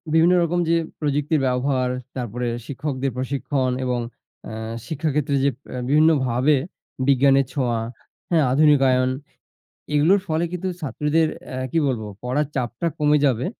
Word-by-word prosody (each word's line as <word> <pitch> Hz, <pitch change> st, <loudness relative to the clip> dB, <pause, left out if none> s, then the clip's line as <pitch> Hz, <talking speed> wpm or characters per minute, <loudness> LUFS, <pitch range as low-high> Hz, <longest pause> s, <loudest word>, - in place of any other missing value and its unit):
বিভিন্ন 165 Hz, +2 st, +5 dB
রকম 175 Hz, +1 st, 0 dB
যে, -, -, +4 dB, 0.3 s
প্রযুক্তির 150 Hz, +1 st, 0 dB
ব্যবহার, 125 Hz, 0 st, 0 dB, 0.3 s
তারপরে 125 Hz, -1 st, -3 dB, 0.2 s
শিক্ষকদের 135 Hz, -1 st, -3 dB
প্রশিক্ষণ 130 Hz, 0 st, -1 dB
এবং 125 Hz, -1 st, 0 dB, 0.5 s
আ -, -, -7 dB, 0.4 s
শিক্ষাক্ষেত্রে 150 Hz, -2 st, -1 dB
যে, -, -, +5 dB, 0.4 s
বিভিন্নভাবে 145 Hz, -2 st, +3 dB, 0.5 s
বিজ্ঞানের 135 Hz, 0 st, +4 dB
ছোঁয়া, 120 Hz, -5 st, 0 dB, 0.5 s
হ্যা? 170 Hz, -, +4 dB
আধুনিকায়ন, 135 Hz, -3 st, +4 dB, 0.9 s
এগুলোর 165 Hz, +8 st, +4 dB
ফলে 160 Hz, +1 st, 0 dB
কিন্তু 180 Hz, +1 st, -3 dB
ছাত্রদের 150 Hz, +2 st, +1 dB, 0.2 s
অ্যাঁ 130 Hz, 0 st, -4 dB
কি -, -, 0 dB
বলব? 125 Hz, -4 st, -1 dB, 0.2 s
পড়ার 130 Hz, +5 st, 0 dB
চাপটা 120 Hz, +3 st, -2 dB
কমে 150 Hz, 0 st, +3 dB
যাবে, 125 Hz, -1 st, +1 dB
140 Hz, 125 wpm, -22 LUFS, 130-155 Hz, 0.9 s, বিভিন্ন